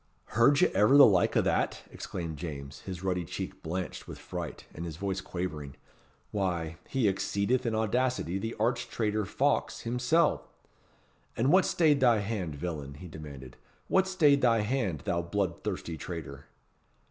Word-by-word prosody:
"Heard 130 +6 +5
ye - - +6
ever 105 +8 +5
the 145 - +11
like 95 -5 +3
o' - - +5
that?" - - 0
exclaimed 85 -3 -5
James, 70 -4 -6
his 95 -1 -7
ruddy 90 -2 0
cheek 80 - -6
blanched 90 +3 -4
with - - -8
fright, - - -6
and 85 - -6
his 80 -3 -6
voice 95 0 -2
quavering. 75 -8 -5 0.6
"Why, 85 -5 -2
he 130 -5 +2
exceedeth 100 +5 0
in 110 - 0
audacity 110 -4 0
the 115 +3 -4
arch 120 +2 0
traitor 110 -2 -1
Fawkes 140 +8 0
himsel'. 125 +7 +2 0.9
And 130 +5 +3
what 190 0 +6
stayed 155 -4 +3
thy 120 -4 +5
hand, 100 -7 -3
villain?" 70 -3 -5
he 90 +5 -9
demanded, 70 -6 -10 0.3
"what 190 0 +3
stayed 150 -7 +4
thy 115 -3 +4
hand, 105 - -1
thou 85 - -1
blood 85 0 -2
thirsty 80 -1 -4
traitor?" 75 -3 -7
100 Hz, 160 wpm, -30 LUFS, 85-120 Hz, 0.9 s, the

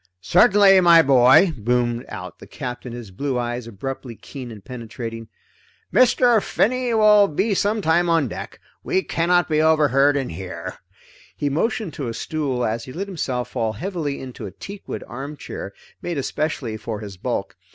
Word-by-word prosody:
"Certainly 195 - +5
my 170 -2 +7
boy," 135 +6 +6
boomed 120 +1 0
out - - -8
the - - -12
Captain, 125 0 -6
his 120 -4 -8
blue 135 +6 -2
eyes 120 -1 -3
abruptly 120 +2 -6
keen 130 +2 -9
and 105 -3 -12
penetrating. 115 -2 -7 0.7
"Mr. 245 -2 +5
Finney 250 +4 0
will 210 -2 +6
be 195 +7 0
some 205 +2 0
time 170 +2 +2
on 165 -5 +3
deck. - - -8 0.2
We 190 - 0
cannot 175 +1 +1
be 155 -1 +2
overheard 145 -3 +4
in 135 -2 -2
here." 90 +2 -7 0.6
He 145 - 0
motioned 185 - -1
to 140 -3 -4
a 115 - -4
stool 135 -6 -2
as 115 +2 -2
he 130 - -9
let 190 +5 -3
himself 130 -10 -3
fall 115 -3 -1
heavily 155 - -4
into 125 -5 -8
a - - -9
teakwood 200 - -8
armchair 135 -5 -7 0.3
made 175 -3 -3
especially 140 -5 -2
for 110 -1 -5
his 100 -2 -8
bulk. - - -3
140 Hz, 160 wpm, -22 LUFS, 120-175 Hz, 0.7 s, my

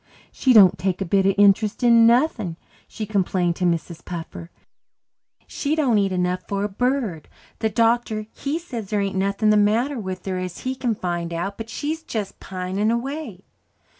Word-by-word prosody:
"She 260 - +1
don't 200 -6 +7
take 190 -1 -1
a 195 - -2
bit 195 +2 +2
of 195 - +2
interest 205 +3 +3
in 230 -1 +6
nothing," 235 - +2 0.3
she 215 - -6
complained 185 -4 0
to 180 - -1
Mrs. 170 -1 -2
Puffer. 170 -1 -7 1.0
"She 295 +1 -2
don't 260 -9 +2
eat 195 -1 +1
enough 180 0 -1
for 200 0 -2
a 205 - -1
bird. 230 - -1 0.3
The 220 - +1
doctor, 225 0 +1
he 285 +3 -3
says 240 - -7
there 210 -1 0
ain't 195 -1 -2
nothing 200 +3 +1
the 210 - +4
matter 230 +6 +2
with 185 -3 -6
her 185 -1 -2
as 185 -1 -6
he 255 - -2
can 250 -3 -1
find 175 -3 -3
out, 175 +4 -3
but 225 +1 -8
she's 305 +7 -3
just 215 -10 -5
pining 190 +3 -2
away." 235 - -4
205 Hz, 180 wpm, -22 LUFS, 185-235 Hz, 1.0 s, don't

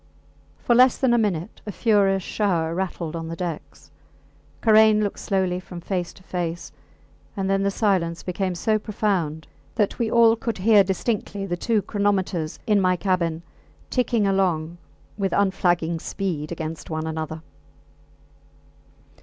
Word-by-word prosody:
For 240 - +1
less 250 +1 +5
than 260 -3 +2
a 240 - +4
minute 200 -3 -2
a - - -2
furious 195 -3 +2
shower 170 -7 0
rattled 170 -3 -3
on 165 -1 -4
the 165 - -5
decks. 155 -5 -7 0.7
Karain 220 -1 +5
looked 205 - -3
slowly 185 -2 0
from 180 -1 -9
face 180 0 -3
to 185 - -18
face, 175 -2 -4 0.7
and 195 -1 -1
then 195 0 +1
the 200 - +2
silence 185 -5 0
became 185 0 -2
so 215 +5 +1
profound 190 -8 -1 0.3
that 210 -4 0
we 230 -2 0
all 230 0 +5
could 230 -1 -3
hear 205 +1 +5
distinctly 200 +1 -2
the 175 -2 -2
two 215 +3 0
chronometers 190 -6 -1
in 210 -2 +3
my 185 -1 +3
cabin 170 -3 -1 0.5
ticking 240 -4 +1
along 175 -4 0 0.4
with 195 -1 0
unflagging 175 -4 +1
speed 165 -5 -4
against 160 -1 -5
one 155 -1 -3
another. 160 0 -4
190 Hz, 145 wpm, -23 LUFS, 170-205 Hz, 0.7 s, less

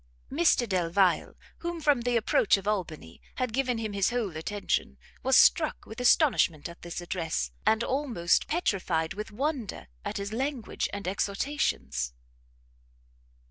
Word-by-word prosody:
Mr 280 -5 +3
Delvile, 185 -1 +1 0.2
who 345 0 -4
from 290 -5 +3
the 240 0 +1
approach 215 -2 +3
of 195 +1 -8
Albany, 165 - -3
had 250 -3 -2
given 255 -2 0
him 220 -2 -3
his 200 -1 +2
whole 230 -8 -2
attention, 200 +6 -2 0.2
was 265 0 +4
struck 315 -3 +4
with 220 +3 -8
astonishment 245 - +3
at 170 - -12
this 175 0 -6
address, 165 - -2 0.2
and 220 +1 +4
almost 255 -11 +1
petrified 185 - 0
with 210 +2 -6
wonder 255 - -3
at - - -4
his 200 +1 -4
language 260 -1 -2
and 200 -2 -5
exhortations. 70 - -1
210 Hz, 140 wpm, -28 LUFS, 175-255 Hz, 0.2 s, was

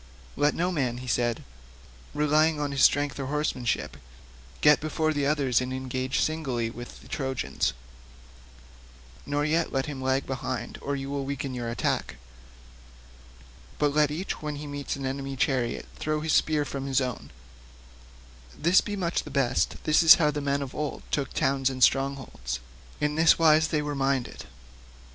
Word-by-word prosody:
"Let 145 +1 +2
no 180 +2 0
man," 130 -8 -1
he 125 - -8
said, 120 -2 0 0.7
"relying 150 +1 +3
on 145 -1 -1
his 135 -1 -1
strength 145 -1 +3
or 135 - -3
horsemanship, 140 -5 -1 0.6
get 150 0 +6
before 155 0 -1
the 145 -2 0
others 140 -5 +2
and 130 0 -3
engage 130 0 -2
singly 130 -8 -1
with 120 +1 -10
the - - -15
Trojans, 135 -2 -2 1.5
nor 145 +1 0
yet 160 +2 +1
let 135 -1 0
him 140 -3 -6
lag 130 +1 0
behind 130 -1 -4
or 140 - -2
you 135 0 -5
will 140 -1 -2
weaken 135 -1 -4
your 120 -2 -3
attack; 115 - -1 1.6
but 145 -1 +1
let 150 -1 +3
each 165 +6 -4
when 150 -1 -4
he 145 +1 -7
meets 145 -1 -4
an 135 -1 -5
enemy's 135 0 -4
chariot 125 -2 0
throw 155 0 -1
his 155 0 0
spear 150 -2 +2
from 140 -1 -5
his 135 -1 +2
own; 125 -3 -4 1.3
this 170 +5 +4
be 205 - -4
much 175 -3 -1
the - - -10
best; 135 -3 +1
this 155 +2 +4
is 165 +1 +10
how 150 -4 +2
the 145 0 -3
men 140 0 0
of 135 - -8
old 150 -1 -4
took 140 -2 -1
towns 135 0 +1
and 130 -1 -1
strongholds; 135 - 0 0.4
in 150 0 0
this 160 +2 +5
wise 160 -1 +4
were 155 - +2 0.2
they - - -5
minded." 135 -2 -1
140 Hz, 165 wpm, -27 LUFS, 130-150 Hz, 1.6 s, is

